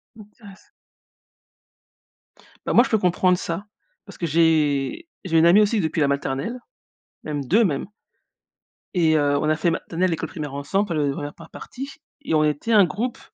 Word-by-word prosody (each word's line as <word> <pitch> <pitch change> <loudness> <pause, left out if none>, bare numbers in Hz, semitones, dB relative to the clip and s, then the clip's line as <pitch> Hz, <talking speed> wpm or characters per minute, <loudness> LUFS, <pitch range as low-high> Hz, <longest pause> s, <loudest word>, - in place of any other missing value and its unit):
Intéress 210 -2 -16 2.0
Bah, - - -1
moi, 240 - +7
je - - -4
peux 220 - +3
comprendre 180 -1 +2
ça 170 +4 -4 0.4
parce 200 - -13
que 170 - -3
j'ai 160 - +1 0.2
j'ai 165 -3 +1
une 160 - +5
amie, 190 +5 +6
aussi, 210 +1 +2
depuis 160 -1 -2
la 145 - +3
maternelle, 140 - -2 0.7
même 145 -2 -4
2, 215 - +3
même 150 -5 -1 1.1
et 165 -4 +3
heu, 145 -1 +2
on 155 +1 0
a 155 - +3
fait 160 +2 0
maternelle 175 +2 -1
et - - +1
école 160 0 -5
primaire 150 -5 -6
ensemble, 190 +9 -1
enfin 165 - -1
le 145 -2 +1
la - - -1
1re 145 +1 -6
par 165 -1 -14
partie 270 +2 -8 0.3
et 220 - -3
on 155 - +4
était 150 +9 -1
un 205 -4 +6
groupe 225 +9 -4
165 Hz, 185 wpm, -22 LUFS, 150-200 Hz, 2.0 s, moi